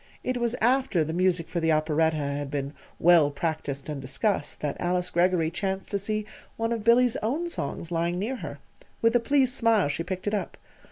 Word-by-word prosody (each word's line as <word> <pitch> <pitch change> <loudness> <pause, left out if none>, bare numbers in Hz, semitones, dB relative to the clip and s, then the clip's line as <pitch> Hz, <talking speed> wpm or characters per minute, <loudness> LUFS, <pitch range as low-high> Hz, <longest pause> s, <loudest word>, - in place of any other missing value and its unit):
It 255 0 -1
was 240 0 0
after 245 -7 +3
the 160 +1 -4
music 180 -1 +1
for 175 - -2
the 165 -1 +2
operetta 155 +1 +2
had 145 -1 -3
been 140 0 -3 0.2
well 165 -4 +5
practised 145 -2 -3
and 150 -3 -4
discussed 145 - -1
that 145 -2 -2
Alice 180 0 0
Greggory 175 -2 +2
chanced 190 +1 -3
to 200 - 0
see 215 +1 -2 0.3
one 230 +1 -1
of 230 -2 -2
Billy's 235 +1 +4
own 285 +11 -1
songs 165 - -4
lying 170 +1 0
near 230 +8 -2
her. - - -7 0.5
With 230 +1 +4
a - - +6
pleased 260 +1 +2
smile 230 - +3
she 155 +3 -2
picked 185 +1 -5
it 205 - -1
up. 205 - -3
180 Hz, 200 wpm, -26 LUFS, 155-225 Hz, 0.5 s, a